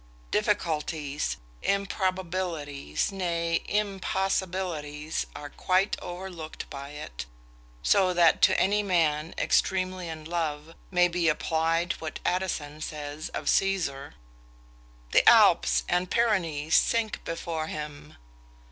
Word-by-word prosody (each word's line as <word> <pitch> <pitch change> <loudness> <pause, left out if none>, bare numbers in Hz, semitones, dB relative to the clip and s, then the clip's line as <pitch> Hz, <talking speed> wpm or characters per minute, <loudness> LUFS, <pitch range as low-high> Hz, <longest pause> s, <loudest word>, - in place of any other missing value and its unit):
Difficulties, 150 -2 -1 0.2
improbabilities, 185 - -1
nay, 170 -3 0
impossibilities, 190 -6 -1
are 145 -1 -7
quite 185 +2 +1
overlooked 175 -3 -7
by 140 0 -7
it; 150 - -7 0.6
so 190 -2 +4
that 170 -2 +4
to - - +5
any 205 +2 +3
man 165 -5 +1
extremely 185 -1 +1
in 160 -1 -7
love, 160 -2 -3 0.2
may 180 -1 +4
be 170 -1 +1
applied 165 +3 +1
what 160 -1 -5
Addison 155 -5 -2
says 150 +1 -5
of - - -5
Caesar, 160 -8 +1 1.0
"The - - +7
Alps, - - +5
and 180 0 +1
Pyrenaeans, 170 -10 +1
sink 230 -2 +2
before 165 -1 -3
him!" 150 -1 -7
165 Hz, 105 wpm, -27 LUFS, 150-185 Hz, 1.0 s, The